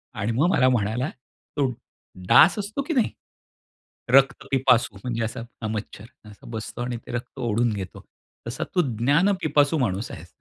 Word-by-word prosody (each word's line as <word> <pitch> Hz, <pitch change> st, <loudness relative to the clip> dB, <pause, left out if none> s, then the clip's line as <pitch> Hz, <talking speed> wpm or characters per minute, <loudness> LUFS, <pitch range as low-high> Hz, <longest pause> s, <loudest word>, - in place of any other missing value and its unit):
आणि 110 Hz, +2 st, -1 dB
मग 140 Hz, +9 st, +2 dB
मला 130 Hz, -8 st, +4 dB
म्हणाला 120 Hz, +3 st, 0 dB, 0.5 s
तो 145 Hz, -, +3 dB, 0.6 s
डास 175 Hz, -, +7 dB
असतो 210 Hz, +7 st, -3 dB
की 320 Hz, +4 st, -3 dB
नाही? 245 Hz, -5 st, +2 dB, 1.0 s
रक्त 135 Hz, 0 st, +4 dB
पिपासू 125 Hz, -6 st, +3 dB
म्हणजे 115 Hz, -2 st, -2 dB
असा 115 Hz, +1 st, -4 dB, 0.2 s
अ, 110 Hz, -, -2 dB
मच्छर 105 Hz, 0 st, -5 dB, 0.2 s
असा 105 Hz, -, -16 dB
बसतो 110 Hz, +1 st, -6 dB
आणि 120 Hz, -1 st, -3 dB
ते -, -, -11 dB
रक्त 120 Hz, +2 st, -6 dB
ओढून 120 Hz, -1 st, +1 dB
घेतो. 95 Hz, -3 st, -7 dB, 0.4 s
तसा 135 Hz, +8 st, -3 dB
तू 180 Hz, -, +5 dB, 0.2 s
ज्ञान 145 Hz, -, +3 dB
पिपासू 150 Hz, 0 st, +3 dB
माणूस 105 Hz, -5 st, -1 dB
आहेस. 85 Hz, +3 st, -11 dB
125 Hz, 160 wpm, -24 LUFS, 110-145 Hz, 1.0 s, डास